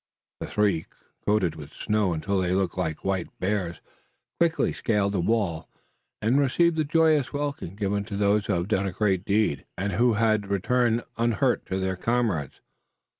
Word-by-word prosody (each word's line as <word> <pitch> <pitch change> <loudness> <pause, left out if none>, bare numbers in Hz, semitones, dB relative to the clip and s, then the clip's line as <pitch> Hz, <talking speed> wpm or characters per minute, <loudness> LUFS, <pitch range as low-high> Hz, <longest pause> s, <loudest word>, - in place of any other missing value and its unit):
The - - -5
three, 100 -6 +1 0.4
coated 100 -6 +2
with 75 -3 -10
snow 105 -3 0
until 95 +4 -1
they 90 0 0
looked 95 -2 0
like 80 -4 -3
white 95 -2 0
bears, 90 -4 -2 0.6
quickly 170 -1 +2
scaled 105 -3 0
the 95 - 0
wall, 95 -4 0 0.5
and 120 +6 +3
received 165 +5 +3
the 155 - +1
joyous 155 -2 +3
welcome, 145 - -3
given 100 0 -1
to 100 -2 -5
those 100 0 +2
who 100 - +1
have 85 0 -1
done 100 -2 +1
a - - -2
great 95 -3 +1
deed, 100 -8 +1
and 100 +2 -1
who 120 +4 +3
return 110 +2 +1 0.2
unhurt 120 +2 +1
to 95 - -2
their 95 -1 -1
comrades. 110 - -1
100 Hz, 165 wpm, -26 LUFS, 95-115 Hz, 0.6 s, and